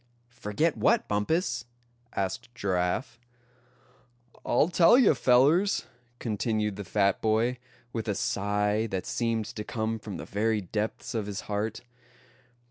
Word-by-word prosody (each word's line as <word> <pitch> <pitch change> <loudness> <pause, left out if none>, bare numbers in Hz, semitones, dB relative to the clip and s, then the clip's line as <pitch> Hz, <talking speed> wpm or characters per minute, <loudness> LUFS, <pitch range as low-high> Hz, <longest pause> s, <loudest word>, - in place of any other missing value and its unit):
"Forget 130 +10 0
what, 110 - +2
Bumpus?" 120 - 0 0.5
asked 100 +5 -2
Giraffe. 95 +4 -1 1.2
"I'll 135 +7 +3
tell 175 +5 +6
you, 250 -10 +6
fellers," 145 +10 +3 0.3
continued 110 -2 -1
the 100 - -6
fat 100 +1 +1
boy, 115 +3 +1 0.3
with 115 -2 -3
a 105 - 0
sigh 105 +3 0
that 95 -3 -3
seemed 115 -2 -1
to 105 - -6
come 110 0 -2
from 105 -3 -7
the - - -7
very 110 +2 0
depths 105 +3 -3
of 110 -3 -2
his 100 0 -4
heart. 105 +1 -3
110 Hz, 125 wpm, -28 LUFS, 105-120 Hz, 1.2 s, tell